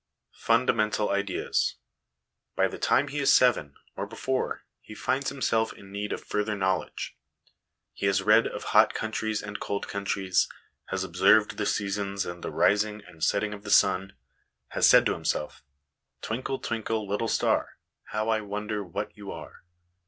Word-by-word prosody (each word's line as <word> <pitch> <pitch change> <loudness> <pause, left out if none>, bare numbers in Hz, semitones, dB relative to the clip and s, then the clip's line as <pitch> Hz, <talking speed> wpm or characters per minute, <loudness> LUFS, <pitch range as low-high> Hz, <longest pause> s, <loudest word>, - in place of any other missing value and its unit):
Fundamental 105 -1 +2
Ideas. 100 -1 0 0.8
By - - +3
the - - -8
time 145 +2 +2
he 145 - -3
is 140 - +4
seven, 95 - +4 0.2
or - - -4
before, 130 0 -2 0.2
he 105 - -11
finds 135 +4 -1
himself 115 -5 0
in 100 -1 -14
need 100 +1 -4
of - - -4
further 105 0 -1
know 95 -2 +1
ledge. - - -7 0.8
He 100 - -1
has 95 0 +2
read 110 +3 +5
of - - -6
hot - - +4
countries 110 -1 -2
and 105 0 -6
cold 100 - -3
countries, 100 -2 0 0.4
has 95 0 -2
observed 95 +4 +3
the 105 - -1
seasons 100 -1 -1
and 85 0 -7
the - - -3
rising 105 0 +2
and 80 -1 -10
setting 105 +1 +1
of 100 - -9
the 100 - -7
sun, 95 -1 +3 0.6
has - - +3
said - - +7
to - - +2
himself 75 - -3 0.6
"Twinkle, 130 +4 -2
twinkle, 110 -3 -3
little 105 +3 -1
star, - - 0 0.3
How 110 +1 -2
I 110 -1 +2
wonder 105 0 -4
what 100 +3 -5
you 100 -2 -8
are - - -10
105 Hz, 160 wpm, -27 LUFS, 100-110 Hz, 0.8 s, said